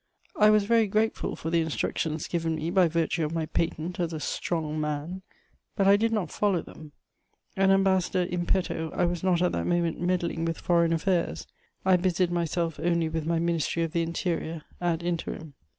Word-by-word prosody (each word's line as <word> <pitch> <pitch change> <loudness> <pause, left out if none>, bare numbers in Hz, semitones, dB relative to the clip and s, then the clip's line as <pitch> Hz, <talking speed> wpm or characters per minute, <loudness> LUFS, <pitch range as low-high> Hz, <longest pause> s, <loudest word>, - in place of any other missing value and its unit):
I 210 0 +5
was 215 -1 +5
very 225 +1 +3
grateful 215 +3 0
for 160 - -5
the 170 -1 +3
instructions 160 0 -2
given 165 -2 -1
me 160 +2 -3
by 185 -2 +4
virtue 165 0 0
of 155 +2 -2
my 160 -1 0
patent 165 +2 -2
as 170 -2 -1
"a 155 - -3
strong 155 0 -2
man," 150 +5 -3 0.5
but 195 -2 +2
I 200 - +7
did 225 +2 +1
not 205 -8 -1
follow 195 -5 +1
them: 150 -2 -13 0.6
an 195 0 +3
ambassador 190 -1 +3
in 175 -1 -3
petto 170 -4 0
I - - +2
was 175 -1 -2
not 180 -2 +2
at 180 - +2
that - - -2
moment 170 -2 0
meddling 175 -2 0
with 165 0 -1
foreign 170 -1 +2
affairs; 170 +1 0 0.4
I 190 -1 +5
busied 180 0 +1
myself 170 -1 -1
only 170 -2 +1
with 160 -1 -3
my 170 0 +1
Ministry 170 0 0
of 165 - -2
the 170 - 0
Interior 165 -1 -2 0.2
_ad 170 -1 0
interim. 165 -3 -4
170 Hz, 190 wpm, -27 LUFS, 165-185 Hz, 0.6 s, I